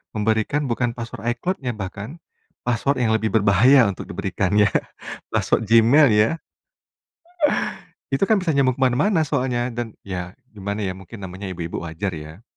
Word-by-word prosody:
memberikan 110 Hz, +7 st, +1 dB
bukan 120 Hz, +1 st, 0 dB
password 115 Hz, -3 st, -7 dB
iCloud-nya 135 Hz, -2 st, -3 dB
bahkan, 100 Hz, -, -6 dB, 0.5 s
password 125 Hz, +4 st, 0 dB
yang 110 Hz, -, +2 dB
lebih 110 Hz, 0 st, 0 dB
berbahaya 110 Hz, +6 st, +6 dB
untuk 95 Hz, -, -8 dB
diberikan -, -, -2 dB
ya, 105 Hz, -1 st, +5 dB, 0.6 s
password -, -, +1 dB
Gmail 115 Hz, +7 st, +6 dB
ya. 105 Hz, +5 st, +4 dB, 1.8 s
Itu 135 Hz, +8 st, +1 dB
kan 220 Hz, -, +4 dB
bisa 165 Hz, -, +1 dB
nyambung 135 Hz, -3 st, +2 dB
kemana-mana 140 Hz, -, +2 dB
soalnya. 125 Hz, -4 st, -1 dB
Dan 120 Hz, -2 st, -5 dB
ya 90 Hz, 0 st, -5 dB, 0.2 s
gimana 100 Hz, 0 st, -4 dB
ya, 95 Hz, -, -1 dB
mungkin 95 Hz, +2 st, -10 dB
namanya 95 Hz, +2 st, -7 dB
ibu-ibu 85 Hz, -2 st, -5 dB
wajar 95 Hz, +5 st, -3 dB
ya. 80 Hz, +5 st, -9 dB
110 Hz, 145 wpm, -22 LUFS, 100-130 Hz, 1.8 s, berbahaya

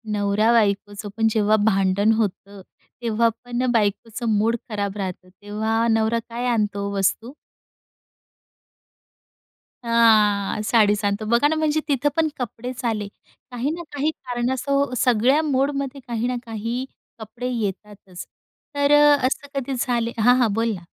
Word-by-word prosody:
नवरा-बायकोचं 205 Hz, 0 st, +1 dB
पण 225 Hz, 0 st, +3 dB
जेव्हा 215 Hz, -1 st, +3 dB
भांडण 195 Hz, 0 st, +2 dB
होतं 200 Hz, -2 st, -3 dB, 0.4 s
तेव्हा 230 Hz, 0 st, +2 dB, 0.2 s
पण 245 Hz, +1 st, -2 dB
बायकोचं 225 Hz, +1 st, -1 dB
मूड 225 Hz, +3 st, +2 dB
खराब 205 Hz, -2 st, -3 dB
राहतं 185 Hz, -2 st, -5 dB
तेव्हा 220 Hz, +4 st, -2 dB
नवरा 225 Hz, 0 st, +2 dB
काय 235 Hz, +2 st, -4 dB
आणतो 210 Hz, -4 st, 0 dB
हो 200 Hz, -, -4 dB
वस्तू? 210 Hz, +5 st, 0 dB, 2.5 s
हां. 215 Hz, -3 st, +3 dB
साडीच 210 Hz, -2 st, +3 dB
आणतो, 205 Hz, +2 st, -1 dB
बघा 235 Hz, +6 st, +3 dB
ना 315 Hz, -, 0 dB
म्हणजे 310 Hz, -1 st, +1 dB
तिथं 285 Hz, 0 st, +1 dB
पण 325 Hz, -1 st, +2 dB
कपडेच 245 Hz, +1 st, -6 dB
आले. 215 Hz, -3 st, -1 dB, 0.4 s
काही 250 Hz, +3 st, -2 dB
ना 340 Hz, +2 st, -5 dB
काही 290 Hz, +2 st, 0 dB
कारण 245 Hz, -4 st, -3 dB
असो 280 Hz, +1 st, 0 dB
सगळ्या 250 Hz, +5 st, +3 dB
मोडमध्ये 275 Hz, -1 st, -1 dB
काही 235 Hz, 0 st, -2 dB
ना 250 Hz, -, -1 dB
काही 230 Hz, +3 st, -4 dB, 0.3 s
कपडे 230 Hz, +3 st, -6 dB
येतातच. 205 Hz, -4 st, -6 dB, 0.5 s
तर 285 Hz, 0 st, +2 dB
अ, 295 Hz, 0 st, +6 dB
असं 285 Hz, +2 st, -4 dB
कधी 270 Hz, +1 st, -4 dB
झाले 235 Hz, -2 st, 0 dB
हां, 245 Hz, +3 st, +5 dB
हां. 230 Hz, -5 st, +2 dB
बोल 225 Hz, +1 st, 0 dB
ना. 180 Hz, -, -10 dB
230 Hz, 135 wpm, -22 LUFS, 210-250 Hz, 2.5 s, अ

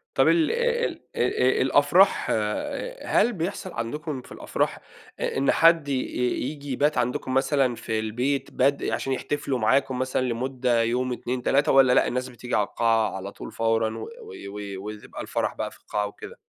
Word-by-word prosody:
طب -, -, +4 dB
ال 330 Hz, -2 st, +4 dB
ال 475 Hz, 0 st, +1 dB, 0.2 s
أ 130 Hz, +1 st, +2 dB
أ -, -, +2 dB
الأفراح 145 Hz, +9 st, +4 dB, 0.7 s
هل 240 Hz, -, +3 dB
بيحصل 185 Hz, +1 st, -4 dB
عندكم 135 Hz, +4 st, -4 dB
في -, -, -17 dB
الأفراح -, -, -2 dB, 0.4 s
إ -, -, -2 dB
إن 135 Hz, -, +3 dB
حد 165 Hz, -3 st, +5 dB
ي 140 Hz, -, +1 dB, 0.5 s
ييجي 145 Hz, -1 st, -6 dB
يبات 145 Hz, +4 st, +1 dB
عندكم 125 Hz, +1 st, -1 dB
مثلًا 135 Hz, -1 st, +2 dB
في 110 Hz, -1 st, -3 dB
البيت 125 Hz, +6 st, -1 dB
بد 140 Hz, +2 st, +2 dB
عشان 135 Hz, -, -1 dB
يحتفلوا 135 Hz, -1 st, -2 dB
معاكم 130 Hz, +3 st, +2 dB
مثلًا 130 Hz, 0 st, 0 dB
لمدة 125 Hz, -1 st, 0 dB
يوم، 125 Hz, +2 st, 0 dB
2 125 Hz, +1 st, -4 dB
3 140 Hz, +2 st, +3 dB
والّا 135 Hz, -2 st, +6 dB
لأ، -, -, +4 dB
الناس 125 Hz, +1 st, -2 dB
بتيجي 125 Hz, 0 st, -4 dB
على 105 Hz, -, +2 dB
القاعة 115 Hz, -3 st, +1 dB
على 95 Hz, +1 st, -6 dB
طول -, -, -9 dB
فورًا 115 Hz, -1 st, 0 dB
و -, -, -6 dB, 0.4 s
و 100 Hz, -1 st, -6 dB
ويبقى 105 Hz, 0 st, -8 dB
الفرح -, -, -2 dB
بقى -, -, -3 dB
في -, -, -17 dB
القاعة 105 Hz, 0 st, -2 dB
وكده؟ 100 Hz, -, -11 dB
130 Hz, 170 wpm, -25 LUFS, 115-145 Hz, 0.7 s, والّا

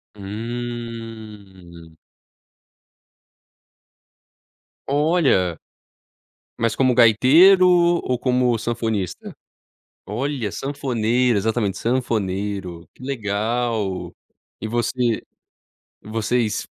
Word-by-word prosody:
Hum. 110 Hz, -6 st, -8 dB, 2.9 s
Olha. 140 Hz, -, +2 dB, 1.0 s
Mas 115 Hz, -1 st, 0 dB
como 130 Hz, -1 st, +2 dB
gaiteiro 150 Hz, -, +6 dB, 0.4 s
ou 125 Hz, -1 st, -1 dB
como 125 Hz, -2 st, +1 dB
sanfonista? 110 Hz, -4 st, -3 dB, 0.7 s
Olha, 120 Hz, -1 st, -3 dB
sanfoneiro. 125 Hz, -4 st, 0 dB
Exatamente, 110 Hz, -1 st, -1 dB
sanfoneiro. 100 Hz, -7 st, -2 dB
Que -, -, -15 dB
legal. 110 Hz, -6 st, -2 dB, 0.5 s
E 110 Hz, -, -4 dB
você 120 Hz, 0 st, 0 dB, 0.8 s
e -, -, -13 dB
vocês 110 Hz, 0 st, -1 dB
115 Hz, 65 wpm, -21 LUFS, 100-125 Hz, 2.9 s, gaiteiro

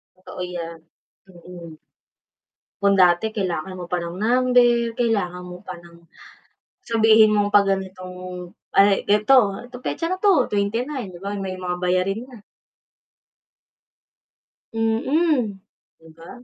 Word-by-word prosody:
Totoo 185 Hz, 0 st, -10 dB
yan, 170 Hz, -2 st, -6 dB, 0.5 s
mm. 175 Hz, -1 st, -12 dB, 1.1 s
Kung 200 Hz, 0 st, +3 dB
dati 175 Hz, +3 st, +4 dB
kailangan 185 Hz, -3 st, -3 dB
mo 180 Hz, -, -6 dB
pa 180 Hz, -, 0 dB
ng 170 Hz, 0 st, -6 dB
number, 240 Hz, 0 st, +3 dB
kailangan 195 Hz, -7 st, -1 dB
mo 180 Hz, -, -9 dB
pa 185 Hz, -, -6 dB
ng 170 Hz, -1 st, -17 dB, 0.9 s
sabihin 220 Hz, -1 st, +5 dB
mong 205 Hz, -1 st, +1 dB
'pag 200 Hz, -1 st, +6 dB
ganitong 185 Hz, -1 st, -6 dB, 0.6 s
ay, 200 Hz, 0 st, +4 dB
eto, 210 Hz, 0 st, +3 dB, 0.2 s
petsa 330 Hz, +6 st, -3 dB
na 370 Hz, -, -2 dB
'to, 370 Hz, -11 st, +3 dB
29 225 Hz, +5 st, -2 dB
'di 175 Hz, -, -11 dB
ba 200 Hz, +1 st, -4 dB
may 190 Hz, -1 st, -4 dB
mga 180 Hz, -1 st, -4 dB
bayarin 185 Hz, +4 st, 0 dB
na. 240 Hz, -6 st, -15 dB, 2.3 s
Mm. 230 Hz, -, 0 dB, 0.4 s
'Di 160 Hz, -, -19 dB
ba? 165 Hz, +1 st, -14 dB
200 Hz, 120 wpm, -22 LUFS, 180-230 Hz, 2.3 s, pag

